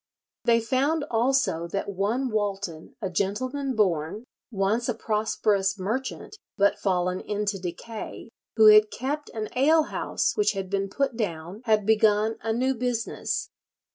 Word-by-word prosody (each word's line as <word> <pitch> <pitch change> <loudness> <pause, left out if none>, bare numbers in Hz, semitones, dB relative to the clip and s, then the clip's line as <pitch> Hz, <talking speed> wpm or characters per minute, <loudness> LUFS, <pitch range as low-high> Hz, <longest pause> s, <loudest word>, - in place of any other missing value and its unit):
They 230 -1 +5
found 280 +6 +1
also 235 -8 +1
that 195 +3 -3
one 225 +8 0
Walton, 200 -6 -3
a 190 - -1
gentleman 255 +9 -1
born, 185 -1 0 0.3
once 215 +3 0
a 240 - 0
prosperous 210 -2 0
merchant, 240 - -4 0.2
"but 200 0 +3
fallen 180 -1 0
into 205 -1 -2
decay," 190 +6 -7 0.3
who 220 -1 +6
had 215 0 +8
kept 290 +6 -4
an 215 -1 -3
alehouse 310 +4 +2
which 420 - +2
had 195 -1 -5
been 195 0 0
put 270 +3 -1
down, 180 -2 -4
had 215 -3 +2
begun 220 0 +3
a 225 - -1
"new 255 +4 +1
business." 245 -2 -2
215 Hz, 140 wpm, -26 LUFS, 195-245 Hz, 0.3 s, had